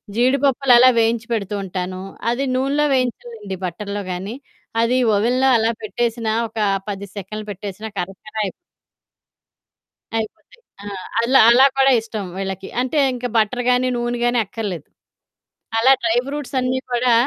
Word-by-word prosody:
జీడిపప్పులలా 255 0 +5
వేయించి 230 0 +1
పెడుతూ 205 -2 -2
ఉంటాను, 185 0 -4 0.3
అది 260 +3 -1
నూనెలో 275 +3 +1
వేయించాలండి 235 -6 -3
బటర్‌లో 200 +3 -4
గానీ, 190 +6 -5 0.5
అది 235 +2 +2 0.2
ఓవెన్‌లో 250 +6 +2
అలా 225 +1 +2
పెట్టేసినా, 230 0 -1 0.2
ఒకా 215 -2 -1 0.2
10 200 0 -5
సెకన్లు 215 +3 -6
పెట్టేసినా, 200 +2 -7
కరకర 195 +4 -7
అయి... 190 - -3 1.7
అయిపోతాయి. 220 - -7 0.2
ఆ! - - -10 0.4
అలా, 255 +3 +4
అలా 255 +3 +7
కూడా 270 0 +5
ఇష్టం 220 -3 -5
వీళ్ళకి. 190 0 -4
అంటే, 260 +5 -2 0.2
ఇంక 250 0 -5
బటర్ 225 +3 +1
గానీ, 250 +1 +3
నూనె 240 0 -2
గానీ 240 0 +2
అక్కర్లేదు. 195 -7 -5 0.9
అలా 260 +4 +5
డ్రై 230 0 +2
ఫ్రూట్సన్నీ 260 -3 -2
కూడా 245 0 +3
230 Hz, 130 wpm, -20 LUFS, 205-255 Hz, 1.7 s, అలా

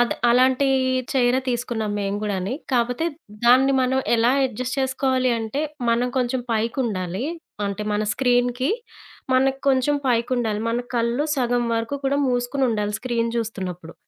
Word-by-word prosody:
అద్ 240 - +3 0.2
అలాంటి 260 +2 +4 0.5
చైరే 255 -1 +3
తీసుకున్నాం 235 -3 -2
మేము 200 0 -2
గూడాని. 200 0 -2 0.2
కాపోతే 245 +6 +1 0.4
దాన్ని 260 +3 +6
మనం 260 +1 +1 0.2
ఎలా 230 +2 +3 0.2
అడ్జస్ట్ 250 +2 -4
చేసుకోవాలి 260 -1 +1
అంటే 225 +5 -3 0.3
మనం 240 +2 +2
కొంచెం 250 +1 0
పైకుండాలి. 220 -3 -1 0.4
అంటే 200 +1 -3
మన 210 - 0
స్క్రీన్‌కి, 245 +2 +1 0.6
మనకి 265 +1 +2
కొంచెం 270 +2 +3
పైకుండాలి, 235 -3 0
మన 235 - 0 0.2
కళ్ళు 235 +4 +1
సగం 245 -1 +1
వరకు 230 +5 -2
కూడా 275 +1 +2
మూసుకొనుండాలి 245 -4 0
స్క్రీన్ 235 -2 -1
జూస్తున్నప్పుడు. 185 -7 -4
245 Hz, 130 wpm, -23 LUFS, 225-260 Hz, 0.6 s, దాన్ని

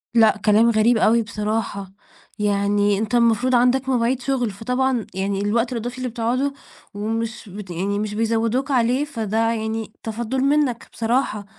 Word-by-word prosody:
لأ، 220 -2 +5
كلام 215 +2 +5
غريب 230 +1 +3
أوي 230 +2 +4
بصراحة، 210 -2 -3 0.5
يعني 205 0 +1
أنت 220 +3 -1
المفروض 235 +2 +3
عندك 250 +2 +2
مواعيد 250 0 +1
شغل، 245 -4 -1
فطبعًا 250 +3 -1
يعني 195 +1 -2
الوقت 230 +4 0
الإضافي 245 +1 -4
اللي 255 -1 -3
بتقعده 245 +5 -1 0.4
ومش 220 +1 -4
بت 195 0 -9
يعني 200 +4 -2
مش 210 -1 -3
بيزوّدوك 230 +5 0
عليه 250 +3 +2
فده 225 -7 -3
يعني 220 -1 -3
تفضُّل 235 +4 -3
منك 280 -4 +1
بصراحة، 225 -3 -1
225 Hz, 145 wpm, -22 LUFS, 210-245 Hz, 0.5 s, لأ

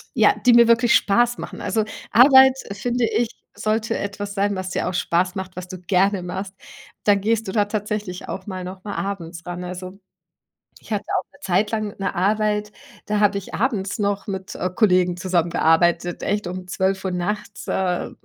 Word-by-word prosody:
ja, - - +5
die 245 - +7
mir 235 0 +7
wirklich 235 0 +4
Spaß 240 +4 +3
machen. - - -7
Also, 220 -1 0 0.3
Arbeit, 265 +2 +8 0.2
finde 240 +4 0
ich, 230 +1 0 0.3
sollte 220 +1 -1
etwas 200 0 -4
sein, 200 0 +1
was 185 0 -4
dir - - -1
auch - - -5
Spaß 180 0 +1
macht, 190 -1 -6
was 180 0 -7
du 185 -1 -7
gerne 190 +2 +1
machst. 185 +2 -5 0.5
Dann 205 -1 +4
gehst 225 +1 0
du - - -2
da 210 -2 +3
tatsächlich 210 -3 -4
auch 190 0 -6
mal 185 -2 -5
noch 185 +1 -8
mal 205 - -5
abends 170 -4 -5
ran. 175 0 -5
Also, 185 +1 -7 0.8
ich - - -17
hatte 205 -1 -1
auch - - -4
'ne - - -20
Zeit 190 +3 +1
lang 215 -2 -2
'ne 195 -1 -2
Arbeit, 210 +2 0 0.3
da 210 0 0
habe 205 -1 +3
ich 195 - -9
abends 205 -4 -1
noch 200 -1 -1
mit, 190 -2 -5
äh, 180 - -1
Kollegen 180 -5 +3
zusammengearbeitet, 175 -1 +1
echt, 205 -1 -1
um 180 0 -6
12:00 190 +1 -1
nachts, 205 +4 -4
äh, 180 -2 -1
195 Hz, 185 wpm, -22 LUFS, 185-210 Hz, 0.8 s, Arbeit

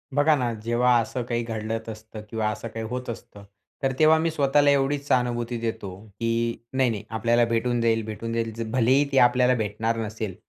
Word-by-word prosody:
बघा 150 +1 +4
ना, 125 -3 -1
जेव्हा 120 +2 +3
असं 125 +2 -4
काही 120 0 -2
घडत 115 0 -4
असतं 110 0 -9
किंवा 110 -1 -1
असं 110 - -6
काही 115 0 -6
होत 125 0 -5
असतं, 105 -3 -9 0.4
तर 135 - +2
तेव्हा 155 +1 +6
मी 165 0 0
स्वतःला 145 -1 +3
एवढीच 140 +1 +1
सहानुभूती 120 -1 0
देतो, 110 -3 -4 0.3
की 115 0 0 0.2
"नाही, 130 -1 +2
नाही, 110 -2 -4
आपल्याला 115 +1 +2
भेटून 115 +1 0
जाईल 115 -1 +2
भेटून 115 +1 -5
जाईल." 115 -1 -1 0.2
भलेही 130 +3 +3
ती 135 - +1
आपल्याला 125 +1 +2
भेटणार 110 +1 -1
नसेल 110 -3 -5
115 Hz, 185 wpm, -25 LUFS, 115-125 Hz, 0.4 s, तेव्हा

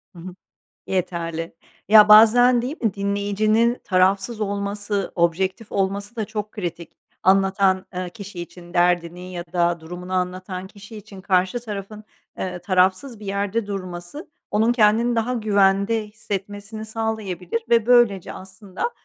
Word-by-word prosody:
Hı 170 - -11
hı. 180 +1 -9 0.5
Yeterli. 165 -3 -3 0.3
Ya, 210 0 +8
bazen 235 +3 +7
değil 270 +6 -4
mi 220 -4 +1
dinleyicinin 205 +4 +1
tarafsız 195 +4 +1
olması, 200 0 -2
objektif 185 +5 -1
olması 200 +3 -2
da 220 - -1
çok 210 0 -5
kritik. 175 -4 -6 0.3
Anlatan, 190 0 +3
eee, 180 -1 -4
kişi 200 -3 -9
için. 175 0 -11
Derdini 175 +1 0
ya 175 -1 -5
da 170 -1 +1
durumunu 180 +3 -8
anlatan 185 +1 -3
kişi 210 +2 -13
için 205 -2 -11
karşı 185 +4 +1
tarafın, 210 -1 -7 0.3
eee, 180 -1 -4
tarafsız 190 +6 +1
bir 210 - -9
yerde 200 +2 -2
durması, 185 - -6 0.2
onun 220 +3 +2
kendini 230 +1 +3
daha 230 +3 0
güvende 205 0 +2
hissetmesini 205 +1 -6
sağlayabilir 220 -3 -3
ve 230 -1 +3
böylece 240 -7 +3
aslında 190 - -6
200 Hz, 130 wpm, -22 LUFS, 185-215 Hz, 0.5 s, Ya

